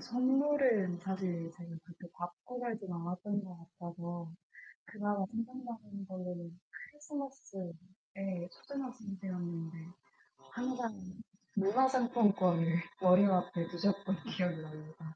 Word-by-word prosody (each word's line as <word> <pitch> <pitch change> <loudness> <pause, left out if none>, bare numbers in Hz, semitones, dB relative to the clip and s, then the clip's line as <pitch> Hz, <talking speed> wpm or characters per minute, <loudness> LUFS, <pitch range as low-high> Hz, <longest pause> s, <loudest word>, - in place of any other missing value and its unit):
선물은 255 -6 +4
사실 180 -2 -1
제가 170 0 -10
그렇게 175 0 -12
받고 175 +8 -6
살진 220 -6 -2
않았던 180 +4 -2
것 180 -2 -8 0.2
같아서 170 -1 -5 0.5
그나마 205 -2 0
생각나는 230 -4 -5
걸로는 180 -2 -5 0.3
크리스마스에 275 - -6 0.8
초등학생 250 -5 -5
때였는데 170 -3 -3 0.7
항상 245 -1 -1 0.6
문화상품권을 205 -7 +5 0.2
머리맡에 180 -2 +6
두셨던 195 +3 +1 0.2
기억이 175 -3 +1
납니다. 155 +1 -9
190 Hz, 260 characters per minute, -36 LUFS, 175-235 Hz, 0.8 s, 머리맡에